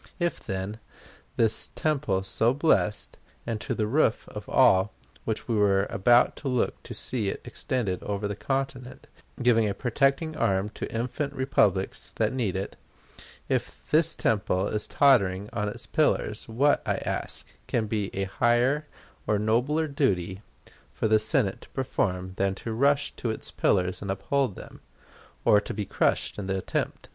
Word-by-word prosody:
If, 175 Hz, -1 st, 0 dB
then, 95 Hz, +3 st, -4 dB, 0.6 s
this 110 Hz, -1 st, +2 dB
temple 130 Hz, -11 st, 0 dB
so 115 Hz, +5 st, +1 dB
blessed, 145 Hz, -8 st, +1 dB, 0.3 s
and 115 Hz, -3 st, -3 dB
to -, -, -2 dB
the 110 Hz, -, 0 dB
roof 120 Hz, 0 st, +1 dB
of 95 Hz, +2 st, +3 dB, 0.4 s
which 110 Hz, -1 st, -3 dB
we 115 Hz, -, 0 dB
were 100 Hz, -1 st, +3 dB
about 120 Hz, +5 st, +4 dB
to 145 Hz, -, -6 dB
look 125 Hz, -2 st, 0 dB
to -, -, -8 dB
see 115 Hz, -6 st, -1 dB
it -, -, -4 dB
extended 110 Hz, -9 st, -2 dB
over 105 Hz, 0 st, -2 dB
the 100 Hz, -, -3 dB
continent, 135 Hz, +1 st, -3 dB, 0.4 s
giving 115 Hz, -3 st, +4 dB
a 100 Hz, -, -3 dB
protecting 135 Hz, +5 st, +1 dB
arm 100 Hz, -2 st, +1 dB
to -, -, -6 dB
infant 125 Hz, +5 st, -2 dB
republics 105 Hz, -8 st, +1 dB
that -, -, 0 dB
need 115 Hz, -8 st, -1 dB
it 95 Hz, +1 st, -4 dB, 0.7 s
if -, -, -2 dB
this 160 Hz, +1 st, +4 dB
temple 100 Hz, -3 st, +1 dB
is 105 Hz, 0 st, -1 dB
tottering 100 Hz, -8 st, +3 dB
on 105 Hz, -1 st, -1 dB
its -, -, -7 dB
pillars, -, -, 0 dB
what, 140 Hz, +6 st, +2 dB
I -, -, 0 dB
ask, -, -, -4 dB
can 115 Hz, -2 st, 0 dB
be 105 Hz, -2 st, -2 dB
a 95 Hz, -, 0 dB
higher 120 Hz, +8 st, +2 dB, 0.4 s
or 105 Hz, -, +2 dB
nobler 125 Hz, +9 st, +1 dB
duty 95 Hz, -, 0 dB, 0.5 s
for -, -, -1 dB
the 110 Hz, 0 st, +4 dB
Senate 110 Hz, -3 st, +1 dB
to -, -, -14 dB
perform 95 Hz, -8 st, -2 dB
than 95 Hz, 0 st, +1 dB
to 115 Hz, +3 st, -5 dB
rush 140 Hz, +4 st, +2 dB
to 120 Hz, -, -2 dB
its 110 Hz, -, -4 dB
pillars 90 Hz, 0 st, +1 dB
and 100 Hz, -, -5 dB
uphold 105 Hz, +4 st, 0 dB
them, -, -, -11 dB, 0.6 s
or 105 Hz, -, +6 dB
be 105 Hz, 0 st, -4 dB
crushed -, -, 0 dB
in 95 Hz, -, -4 dB
the 95 Hz, 0 st, 0 dB
attempt? 95 Hz, -, -3 dB
110 Hz, 160 wpm, -27 LUFS, 100-130 Hz, 0.7 s, or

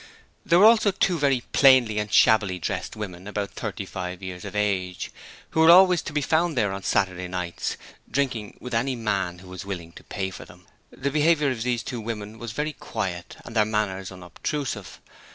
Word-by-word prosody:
There 170 Hz, -, +4 dB
were 195 Hz, -, +7 dB
also 220 Hz, -2 st, +6 dB
two 185 Hz, -3 st, +1 dB
very 135 Hz, -3 st, +2 dB
plainly 130 Hz, -6 st, +5 dB
and 105 Hz, -1 st, -3 dB
shabbily 100 Hz, -2 st, +4 dB
dressed 85 Hz, -, -4 dB
women 95 Hz, -3 st, -7 dB
about 105 Hz, -1 st, -3 dB
thirty 100 Hz, -, -5 dB
five 90 Hz, 0 st, -6 dB
years 90 Hz, -1 st, -6 dB
of -, -, -7 dB
age, 95 Hz, -3 st, -1 dB, 0.4 s
who -, -, -1 dB
were 160 Hz, +1 st, +7 dB
always 180 Hz, 0 st, +7 dB
to -, -, -6 dB
be 150 Hz, 0 st, 0 dB
found 160 Hz, 0 st, +1 dB
there 105 Hz, -4 st, +1 dB
on 95 Hz, -, -5 dB
Saturday 90 Hz, -2 st, 0 dB
nights, 90 Hz, -1 st, -3 dB, 0.3 s
drinking 120 Hz, -5 st, -2 dB
with 125 Hz, -1 st, -8 dB
any 125 Hz, +3 st, +1 dB
man 100 Hz, -6 st, -1 dB
who 90 Hz, +1 st, -14 dB
was 95 Hz, +2 st, -8 dB
willing 90 Hz, -4 st, -6 dB
to -, -, -14 dB
pay 95 Hz, -1 st, -4 dB
for -, -, -9 dB
them. 90 Hz, 0 st, -17 dB, 0.2 s
The 140 Hz, +1 st, -3 dB
behaviour 150 Hz, -1 st, +3 dB
of 120 Hz, -3 st, -4 dB
these 120 Hz, -1 st, -1 dB
two 120 Hz, -3 st, -5 dB
women 110 Hz, -1 st, -6 dB
was 120 Hz, -2 st, -6 dB
very 150 Hz, +7 st, -2 dB
quiet 95 Hz, -9 st, -5 dB
and 115 Hz, -, -9 dB
their 110 Hz, -, +5 dB
manners 105 Hz, -3 st, -2 dB
unobtrusive. 95 Hz, -, -5 dB
105 Hz, 195 wpm, -25 LUFS, 95-135 Hz, 0.4 s, were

